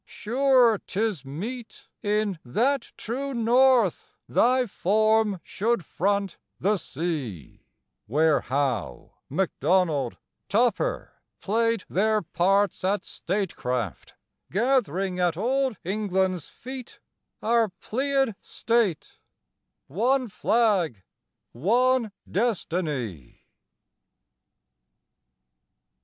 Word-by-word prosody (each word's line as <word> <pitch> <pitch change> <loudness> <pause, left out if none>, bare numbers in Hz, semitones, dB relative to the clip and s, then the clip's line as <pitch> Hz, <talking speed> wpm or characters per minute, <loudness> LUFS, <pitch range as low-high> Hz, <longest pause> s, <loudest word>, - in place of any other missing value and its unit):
Sure 245 -2 +3
'tis 205 -7 -2
meet 215 - -7
In 205 -3 0
"that 255 - 0
true 270 +4 -4
North" 240 -3 +3
thy 255 +1 +3
form 215 0 +2
should 225 -4 -1
front 200 +4 -1 0.2
the 205 +2 +1
sea, 145 - -5 0.4
Where 150 +4 +3
Howe, 130 -6 -2 0.2
McDonald, 160 -4 +1 0.3
Tupper 245 - 0 0.2
played 230 0 +1
their 215 +2 +1
parts 195 +4 +1
At 200 +2 0
statecraft, 125 - -3 0.4
gath'ring 195 - +1
at 175 -2 +1
Old 260 +3 0
England's 190 -3 -1
feet 255 -1 -9 0.4
Our 230 -1 +3
Pleiad 270 +5 -1
State, 225 -8 -1 0.7
one 245 - +1
flag, 195 - +1 0.5
one 235 - +2 0.2
destiny. 160 - -2
205 Hz, 80 wpm, -26 LUFS, 170-235 Hz, 0.7 s, Sure